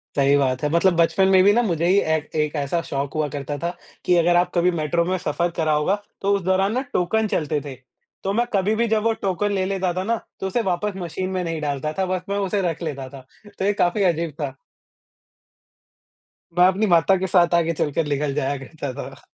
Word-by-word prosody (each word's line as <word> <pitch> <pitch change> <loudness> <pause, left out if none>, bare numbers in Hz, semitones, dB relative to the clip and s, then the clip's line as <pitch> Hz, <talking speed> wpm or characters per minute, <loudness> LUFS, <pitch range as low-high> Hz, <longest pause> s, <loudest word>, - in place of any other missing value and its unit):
सही 140 0 +4
बात 130 -2 0
है 150 - +1
मतलब 170 +1 +3
बचपन 190 +3 +3
में 190 -1 +5
भी 205 +1 +6
ना 240 - +3
मुझे 170 -5 0
ही 190 - +4
ए 160 -3 +1 0.3
एक 150 +1 -4
ऐसा 145 +4 -1
शौक 140 0 -3
हुआ 155 -1 0
करता 145 +1 -5
था, 170 +3 -3 0.3
कि 180 - +4
अगर 175 +1 +3
आप 175 +1 +2
कभी 175 +1 +3
मेट्रो 170 +1 0
में 185 +1 0
सफर 170 +1 -1
करा 155 -1 +1
होगा, 150 +7 +2 0.3
तो 200 +1 +1
उस 195 - -2
दौरान 190 +3 +1
ना 255 - 0
टोकन 215 +5 +1
चलते 155 -5 -1
थे। 135 - -7 0.5
तो 195 +1 -1
मैं 240 +2 +2
कभी 200 +2 +2
भी 235 +1 +1
जब 220 -1 +1
वो 230 0 +2
टोकन 200 0 -1
ले 190 -1 0
लेता 190 -2 -1
था 185 +1 -2
ना, 230 +3 0 0.2
तो 190 - -2
उसे 235 +5 0
वापस 195 +3 -2
मशीन 185 +1 -4
में 185 -1 -2
नहीं 165 -2 -3
डालता 150 +1 -2
था 190 - +2
बस 185 -1 -2
मैं 200 - -1
उसे 200 0 0
रख 165 - -10
लेता 135 -4 -5
था, 135 -2 -12 0.3
तो 190 - 0
ये 205 - +3
काफ़ी 195 +2 +1
अजीब 170 -3 +1
था। 135 -2 -3 2.0
मैं 180 - +7
अपनी 195 +4 +1
माता 175 +2 +4
के 190 +1 -2
साथ 175 -1 +3
आगे 165 -1 +2
चलकर 150 +1 -1
निकल 145 -1 -1
जाया 140 -1 -1
करता 135 0 -7
था। 135 0 -8
175 Hz, 230 wpm, -22 LUFS, 150-190 Hz, 2.0 s, मैं